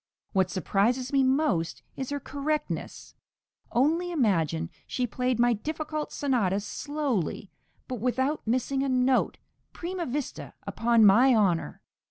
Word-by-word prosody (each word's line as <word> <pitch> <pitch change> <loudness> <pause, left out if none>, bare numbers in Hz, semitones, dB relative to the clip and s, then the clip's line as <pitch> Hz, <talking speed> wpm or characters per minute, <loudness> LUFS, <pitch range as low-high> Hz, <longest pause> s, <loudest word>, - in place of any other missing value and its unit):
What 190 -2 +2
surprises 230 - 0
me 275 - +4
most 260 - +1
is 265 - -4
her 285 0 -2
correctness. 295 +2 -3 0.6
Only 325 +8 +2
imagine, 165 - +1 0.2
she 250 - -1
played 250 +1 -1
my 240 0 +4
difficult 310 +5 -4
sonatas 210 -8 0
slowly, 270 - -2 0.4
but 250 -2 -4
without 260 +6 0
missing 255 +3 0
a 275 - 0
note, 255 0 +2 0.4
prima 355 0 -4
vista, 275 +2 -4
upon 230 -1 +3
my 240 +6 +6
honour. 190 -6 +1
255 Hz, 125 wpm, -27 LUFS, 215-285 Hz, 0.6 s, my